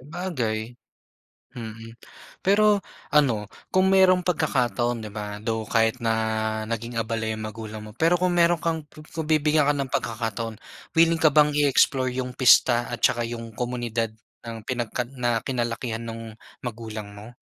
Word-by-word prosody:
Sabagay. 130 -8 -3 0.8
Mm. 115 -2 -8 0.5
Pero 205 +1 +4 0.3
ano 130 -8 +3 0.3
kung 190 +1 +4
merong 185 -1 +5
pagkakataon, 120 - 0
di 105 - -7
ba? 105 0 -5
Though 110 -1 -2
kahit 115 +2 +2
na 110 -1 0
naging 115 +1 -4
abala 115 -1 -2
yung 110 0 -3
magulang 110 0 -7
mo, 105 - -10
pero 165 +9 +2
kung 180 0 +1
meron 175 0 +4
kang 160 -3 -1
ku 155 - -14
kung 160 -2 -4
bibigyan 150 -1 +3
ka 145 - +3
ng 135 -2 -3
pagkakataon, 115 -1 -2 0.4
willing 165 0 +5
ka 155 - +5
bang 150 0 +5
i-explore 140 -2 +3
yung 125 -1 -2
pista 120 -1 +5
at 120 - -6
tsaka 120 -2 +3
yung 115 -1 -6
komunidad 115 -1 -2 0.3
ng 115 -2 -6
pinagkad 120 0 -3
na 120 -2 +1
kinalakihan 120 -2 -2
nung 115 0 -7 0.3
magulang 110 -3 -6
mo? 105 +4 -12
120 Hz, 150 wpm, -25 LUFS, 110-150 Hz, 0.8 s, merong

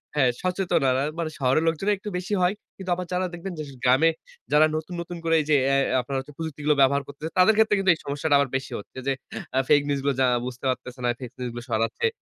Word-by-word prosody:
হ্যাঁ 135 -4 +4
সচেতনরা 165 -8 +1 0.2
মানে 160 -2 -1
শহরের 135 +4 +2
লোকজনে 180 +6 +1
একটু 210 +2 -7
বেশি 185 +3 -4
হয়। 180 +2 +3 0.2
কিন্তু 190 -1 -7
আবার 180 0 -4
যারা 185 +1 +1
দেখবেন 175 +2 -6
যে - - -2 0.2
গ্রামে 130 +6 +5 0.4
যারা 150 +1 +6
নতুন, 160 +3 -4
নতুন 170 0 -7
করে 165 0 +2
এই - - -6
যে 150 - +5 0.2
AI 135 - +4 0.2
আপনারা 135 +2 -4
হচ্ছে 140 +2 -9
প্রযুক্তিগুলো 150 -2 -1
ব্যবহার 140 +1 +4
করতেছে 145 +3 -6
তাদের 185 +4 +6
ক্ষেত্রে 220 -1 +4
কিন্তু 190 -2 +4
এই - - -16
সমস্যাটা 145 +1 +1
আবার 140 -2 +1
বেশি 135 - -3
হচ্ছে 105 - -14
যে 135 - +3 0.4
আ - - +5
ফেইক 145 -1 +6
নিউজগুলো 140 -1 0
যারা 125 -1 +4
বুঝতে 125 0 -7
পারতেছে 125 0 -4
না, - - +2
ফেইক 125 -2 -7
নিউজগুলো 120 -1 -5
ছড়াচ্ছে। 115 - 0
150 Hz, 220 wpm, -25 LUFS, 130-175 Hz, 0.4 s, যারা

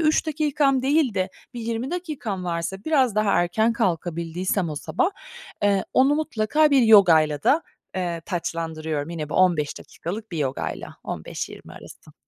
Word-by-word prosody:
3 310 0 +2
dakikam 295 -2 +1
değil 275 -4 +2
de 185 -1 0 0.3
bir 240 - -5
20 230 +4 -3
dakikam 280 - -4
varsa, 175 +3 -3
biraz 265 -8 +2
daha 215 -1 +2
erken 220 +7 +2
kalkabildiysem 175 -3 -1
o - - -4
sabah, 365 - 0 0.5
eee, 200 -2 +2
onu 270 +3 +4
mutlaka 300 +1 +2
bir 270 -3 +5
yogayla 165 -9 +6
da, 315 +4 +3 0.3
eee, 175 -2 -2
taçlandırıyorum. 160 -3 -3
Yine 155 -3 -4
bu - - -6
15 170 -6 +2
dakikalık 205 +3 -7
bir 165 - -3
yogayla, 130 - -3
15-20 - - -6
arası. - - -14
200 Hz, 145 wpm, -24 LUFS, 170-265 Hz, 0.5 s, yogayla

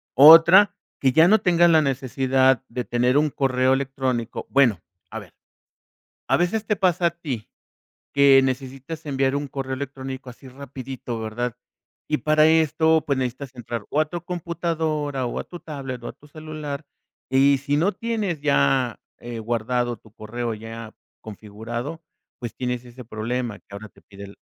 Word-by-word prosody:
Otra, 170 +8 +8 0.2
que 130 - +3
ya 160 +6 +6
no 215 +4 +6
tengas 175 -3 +4
la 160 -2 +5
necesidad 130 -1 +1
de 125 +1 -4
tener 125 +2 +1
un 155 0 +1
correo 130 -2 +1
electrónico. 130 -3 -2
Bueno, 125 -9 +3 0.3
a - - -5
ver, - - -15 0.9
a - - +3
veces 200 +5 -1
te 210 - +2
pasa 180 -3 +2
a - - +2
ti, 145 -10 -6 0.6
que 140 -1 +6
necesitas 135 +4 -4
enviar 135 -1 0
un 145 0 -2
correo 135 -1 -5
electrónico 130 -1 -7
así 130 +3 -15
rapidito, 130 -2 -7
¿verdad? 110 +2 -3 0.5
Y 150 - 0
para 155 0 +3
esto, 160 0 +3
pues, 140 -3 0
necesitas 130 +1 -4
entrar, 120 -2 -6
o, 150 - 0
a - - +1
tu 170 +2 -6
computadora, 160 -5 -2
o, 120 - -4
a - - -3
tu 175 - -10
tablet, 135 -6 -7
o, - - -6
a - - -8
tu 150 - -20
celular, 155 -1 -7 0.4
y 135 +2 +4
si 140 +2 -1
no 175 +7 +2
tienes 210 -5 -2
ya, 135 -4 +2 0.2
eh, 120 -1 -7
guardado 120 +1 -1
tu 110 - -21
correo 115 +2 -4
ya 115 0 -9 0.3
configurado, 115 +8 -7 0.4
pues, 120 -3 -6
tienes 125 -1 -3
ese 125 +1 -11
problema 115 0 -4
que - - -44
ahora 100 +2 -9
te - - -23
pide, 100 0 -12
135 Hz, 165 wpm, -23 LUFS, 120-155 Hz, 0.9 s, Otra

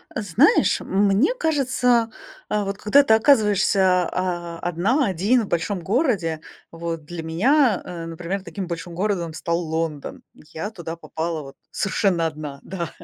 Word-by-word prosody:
Знаешь, 220 - +3
мне 200 - +2
кажется, 255 - +1 0.4
а 210 -1 0
вот 195 0 -3
когда 275 +8 +4
ты 245 - +4
оказываешься, 200 - +3
а, 175 -2 -3
одна, 195 - +1
один 200 +6 +2
в 205 - -6
большом 175 +3 -1
городе, 195 - 0 0.3
вот 165 -1 -5
для 170 +1 -6
меня, 220 - +2
э, 170 -2 -7
например, 170 +4 -4
таким 195 -1 -6
большим 170 0 -6
городом 180 -4 -1
стал 170 +1 -1
Лондон. 160 -3 -4
Я 160 +7 -7
туда 170 -5 -7
попала 165 -1 -4
вот 135 -1 -11 0.2
совершенно 190 -3 0
1 150 -3 -7
да. 170 -4 -5
185 Hz, 145 wpm, -23 LUFS, 165-215 Hz, 0.4 s, когда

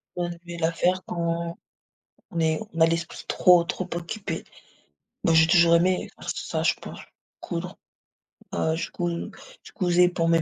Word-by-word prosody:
On 175 -1 -1
devait 170 0 -8
la 165 0 +2
faire 180 +2 +1
quand 170 -1 -2 0.7
on 165 - -2
est 160 +2 +1
on 165 - -3
a 160 - +8
l'esprit 165 0 -3
trop 180 -2 +5
trop 185 +2 -4
occupé. 175 +5 -4 0.8
Moi 165 - +4
j'ai 160 0 +7
toujours 170 -1 +6
aimé, 180 +2 +1
faire - - -10
ça - - -3
je - - +3
pense, - - -10 0.4
coudre. - - -5 0.8
Heu, 160 0 +1
je 165 - -3
cous 175 0 -2 0.5
je - - -13
cousais 180 -3 +4
pour 165 -1 0
mes 165 -1 +4
170 Hz, 165 wpm, -25 LUFS, 165-175 Hz, 0.8 s, a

